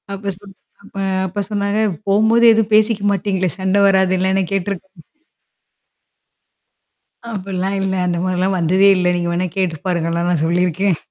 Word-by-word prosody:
அப்ப 200 Hz, 0 st, -5 dB
சொன் 195 Hz, -2 st, -15 dB, 0.3 s
அப்ப 200 Hz, -, -14 dB, 0.3 s
அப்பா 200 Hz, +3 st, -4 dB
சொன்னாரு 200 Hz, +1 st, -1 dB, 0.3 s
"போம்போது 220 Hz, +4 st, +3 dB
எதுவும் 220 Hz, -1 st, 0 dB
பேசிக்க 215 Hz, -1 st, +3 dB
மாட்டீங்களே! 190 Hz, -1 st, -1 dB
சண்டை 190 Hz, +1 st, +1 dB
வராதல்ல" 190 Hz, -1 st, +2 dB, 0.2 s
கேட்டுருக் 195 Hz, -1 st, -3 dB, 2.5 s
அப்ட்லாம் 195 Hz, -1 st, -3 dB
இல்ல. 190 Hz, 0 st, -1 dB
அந்த 175 Hz, -1 st, -1 dB
மாரிலாம் 185 Hz, +1 st, 0 dB
வந்ததே 185 Hz, +4 st, +3 dB
இல்ல. 180 Hz, -1 st, 0 dB
நீங்க 175 Hz, 0 st, -2 dB
வேணா 180 Hz, +1 st, -1 dB
கேட்டு 180 Hz, -4 st, -1 dB
பாருங்கலாம் 170 Hz, 0 st, -1 dB
நான் 160 Hz, -3 st, 0 dB
சொல்லிருக்கேன். 180 Hz, +1 st, 0 dB
190 Hz, 130 wpm, -18 LUFS, 180-200 Hz, 2.5 s, போம்போது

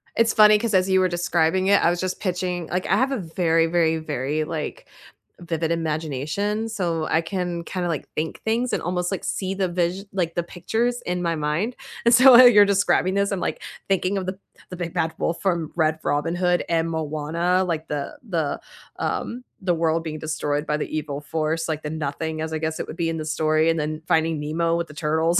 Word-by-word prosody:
It's 230 Hz, 0 st, +3 dB
funny 215 Hz, -1 st, +7 dB
'cause 225 Hz, 0 st, -2 dB
as 185 Hz, 0 st, +3 dB
you 190 Hz, 0 st, +4 dB
were 185 Hz, -, +3 dB
describing 175 Hz, +1 st, +1 dB
it, 200 Hz, 0 st, +4 dB
I 170 Hz, -, +5 dB
was 175 Hz, 0 st, -1 dB
just 185 Hz, 0 st, -3 dB
pitching 180 Hz, -3 st, -2 dB
like 180 Hz, +2 st, -2 dB
I -, -, +3 dB
have 260 Hz, +4 st, +2 dB
a 270 Hz, -, 0 dB
very, 165 Hz, -3 st, +1 dB
very, 165 Hz, -1 st, +2 dB
very, 150 Hz, -1 st, -2 dB
like, 155 Hz, -1 st, -5 dB, 0.5 s
vivid 165 Hz, -1 st, -2 dB
imagination, 165 Hz, +7 st, -2 dB
so 170 Hz, -7 st, -2 dB
I 160 Hz, -, +3 dB
can 175 Hz, -1 st, -3 dB
kinda 180 Hz, +1 st, -3 dB
like 160 Hz, -5 st, -3 dB
think 160 Hz, +1 st, -3 dB
things 235 Hz, +3 st, 0 dB
and -, -, -1 dB
almost, 180 Hz, +1 st, -1 dB
like, 195 Hz, -, -3 dB
see 190 Hz, 0 st, -2 dB
the 190 Hz, -1 st, -1 dB
vis 175 Hz, +2 st, -1 dB
like, 175 Hz, -4 st, -2 dB
the 175 Hz, -, 0 dB
pictures 225 Hz, +8 st, -2 dB
in 180 Hz, 0 st, -2 dB
my 170 Hz, -1 st, 0 dB
mind, 155 Hz, +11 st, -1 dB, 0.3 s
and 235 Hz, -, +4 dB
so 255 Hz, +2 st, +8 dB
while 245 Hz, +1 st, +10 dB
you're 205 Hz, -3 st, +7 dB
describing 195 Hz, -1 st, +2 dB
this, 200 Hz, +1 st, +1 dB
I'm, 195 Hz, -, -1 dB
like, -, -, -3 dB, 0.3 s
thinking 195 Hz, 0 st, +1 dB
of 190 Hz, -, -2 dB
the 185 Hz, +1 st, -4 dB, 0.3 s
the 180 Hz, -, -6 dB
Big 170 Hz, -2 st, -5 dB
Bad 160 Hz, 0 st, 0 dB
Wolf 165 Hz, -, -2 dB
from 170 Hz, -5 st, 0 dB
Red 155 Hz, 0 st, +2 dB
Robin 145 Hz, +4 st, 0 dB
Hood 180 Hz, 0 st, +1 dB
and 165 Hz, 0 st, +1 dB
Moana, 160 Hz, +4 st, 0 dB
like 165 Hz, -3 st, -3 dB
the 145 Hz, -1 st, -4 dB
the, 160 Hz, -6 st, -1 dB, 0.4 s
um 250 Hz, +2 st, -3 dB, 0.2 s
the 180 Hz, -2 st, +1 dB
world 165 Hz, 0 st, +1 dB
being 155 Hz, -1 st, -5 dB
destroyed 150 Hz, -1 st, -2 dB
by 150 Hz, -, 0 dB
the -, -, -3 dB
evil 145 Hz, -2 st, -4 dB
force, 160 Hz, +2 st, -2 dB
like, 155 Hz, -1 st, -3 dB
the 150 Hz, -, -3 dB
Nothing 155 Hz, +1 st, -3 dB
as 160 Hz, 0 st, -3 dB
I -, -, 0 dB
guess 160 Hz, 0 st, -3 dB
it -, -, -4 dB
would -, -, -7 dB
be 165 Hz, -2 st, 0 dB
in 165 Hz, -, -2 dB
the 155 Hz, -, -4 dB
story, 155 Hz, +1 st, +2 dB
and 165 Hz, 0 st, +1 dB
then 155 Hz, +1 st, -3 dB
Finding 160 Hz, -1 st, +2 dB
Nemo 165 Hz, +3 st, 0 dB
with 170 Hz, 0 st, -2 dB
the 150 Hz, -, -12 dB
turtles, 160 Hz, +3 st, +1 dB
170 Hz, 220 wpm, -23 LUFS, 160-185 Hz, 0.5 s, while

